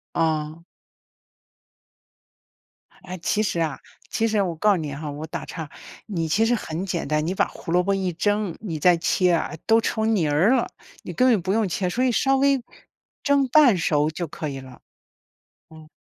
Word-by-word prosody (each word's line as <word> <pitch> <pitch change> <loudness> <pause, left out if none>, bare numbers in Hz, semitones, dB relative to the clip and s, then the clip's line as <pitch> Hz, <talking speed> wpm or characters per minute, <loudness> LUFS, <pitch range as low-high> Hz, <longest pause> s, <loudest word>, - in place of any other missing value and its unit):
哦。 160 0 -1 2.4
哎， 185 0 -7
其 210 - 0
实 190 -5 -1
啊 160 -4 -1 0.3
其 225 - 0
实 215 -2 +1
我 175 -4 -2
告 210 +6 +3
诉 195 - +2
你 150 -4 -4
哈， 150 +1 -6
我 145 +2 -6
打 - - -6
岔， 160 -4 -7 0.4
你 170 -6 -2
其 210 +8 +2
实 240 - +2
很 180 -5 -3
简 170 -5 -3
单， 150 +1 0
你 180 - -1
把 - - +1
胡 165 - -8
萝 180 +1 +4
卜 195 +2 0
一 190 -2 -1
蒸， 205 +1 -1
你 180 -7 -5
再 175 +3 +4
切 180 +2 +2
啊 165 - 0
都 225 0 +5
成 220 0 0
泥 170 -6 +1
儿 160 +10 +3
了， 260 -2 +2 0.4
你 - - -7
根 255 - +2
本 250 - +5
就 195 - -2
不 185 +3 -1
用 220 -2 +1
切， 180 +1 -1
所 245 +8 -1
以 255 - +3
稍 270 +3 +2
微 275 -1 +2 0.6
蒸 280 -2 +3
半 255 -6 +5
熟 150 -2 +1
就 170 +2 -5
可 150 0 -5
以 135 -1 -6
了， 130 -2 -13 0.9
嗯。 160 -1 -14
180 Hz, 210 characters per minute, -23 LUFS, 160-220 Hz, 2.4 s, 都